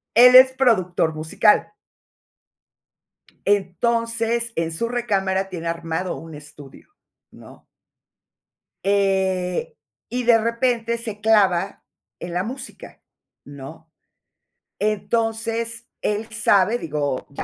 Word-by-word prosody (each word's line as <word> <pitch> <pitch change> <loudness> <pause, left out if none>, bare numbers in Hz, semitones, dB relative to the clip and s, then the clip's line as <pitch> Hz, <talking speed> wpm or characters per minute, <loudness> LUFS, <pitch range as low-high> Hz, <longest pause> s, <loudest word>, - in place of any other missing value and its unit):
Él 250 +2 +8
es 260 0 +9
productor 185 -11 +1
musical. 160 +7 +2 1.7
Entonces, 230 +4 0
en 165 0 -2
su 230 +9 -2
recámara 195 -5 -1
tiene 170 -3 -6
armado 165 +2 -3
un 165 -1 -11
estudio, 150 -2 -13 0.4
¿no? - - -16 1.2
Eh, 190 -2 0 0.3
y 250 +1 -2
de 235 -1 +5
repente 235 0 -1
se 220 -3 -6
clava 200 -4 +2 0.4
en 175 - -7
la 180 +1 -1
música, 255 +6 -9 0.4
¿no? 145 +3 -12 0.9
Entonces, 225 +2 -2
él 210 +1 -2
sabe 215 0 +2
digo, 145 - -3
ya 140 - -6
205 Hz, 95 wpm, -22 LUFS, 170-230 Hz, 1.7 s, es